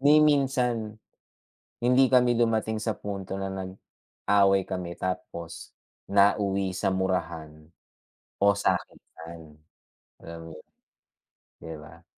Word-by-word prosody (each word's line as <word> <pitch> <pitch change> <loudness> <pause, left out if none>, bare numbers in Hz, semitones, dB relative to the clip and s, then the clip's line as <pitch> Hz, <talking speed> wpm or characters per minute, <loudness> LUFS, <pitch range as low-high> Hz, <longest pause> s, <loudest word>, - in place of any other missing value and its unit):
Ni 150 +2 +6
minsan, 125 -7 +1 0.8
hindi 125 +2 +4
kami 125 -1 +5
dumating 110 -2 +1
sa 110 -1 -2
punto 95 -1 -5
na 95 - -3
nag-away 95 +1 0
kami, 90 -2 -5
tapos 85 -2 -5 0.4
nauwi 100 -1 +2
sa 95 - 0
murahan 80 -4 -3 0.7
o 100 0 +4
sakitan, 80 -5 -4 0.7
alam 85 0 -8
mo - - -11
'yun, - - -18 0.9
'di 80 0 -7
ba. 80 +3 -14
95 Hz, 105 wpm, -27 LUFS, 85-110 Hz, 0.9 s, Ni